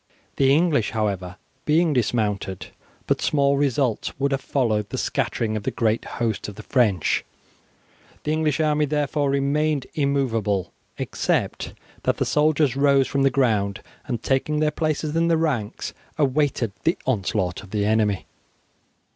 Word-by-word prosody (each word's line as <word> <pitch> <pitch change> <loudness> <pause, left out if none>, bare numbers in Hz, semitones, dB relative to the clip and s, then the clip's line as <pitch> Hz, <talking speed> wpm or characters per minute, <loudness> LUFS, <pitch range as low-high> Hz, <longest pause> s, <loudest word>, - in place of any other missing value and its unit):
The 135 -1 +4
English, 150 -6 +3
however, 95 -4 -1 0.3
being 160 +1 +3
dismounted, 105 -6 -1 0.4
but - - 0
small 140 -1 +2
results 135 -4 0
would 140 +1 +1
have 135 0 0
followed 110 -8 0
the - - -4
scattering 110 -2 -1
of 110 - -2
the - - -1
great 110 -1 0
host 115 -3 -1
of 105 - -8
the - - -9
French. 105 - +2 1.0
The 150 - -1
English 155 -1 +1
army 150 -1 +2
therefore 145 0 0
remained 140 +1 +1
immovable, 125 - 0 0.3
except - - -1 0.3
that - - 0
the - - 0
soldiers 150 -2 +2
rose 140 -1 +4
from 140 - 0
the 135 - +5
ground, 110 -7 +1 0.2
and 120 -5 -3
taking 145 +3 +1
their 155 0 +2
places 155 0 -1
in 165 0 +2
the 165 -1 +3
ranks, 130 -9 -2 0.2
awaited 140 -5 +1
the 165 - +2
onslaught 95 -3 -1
of 100 - -13
the 105 0 0
enemy. 105 -2 +1
135 Hz, 145 wpm, -23 LUFS, 110-150 Hz, 1.0 s, the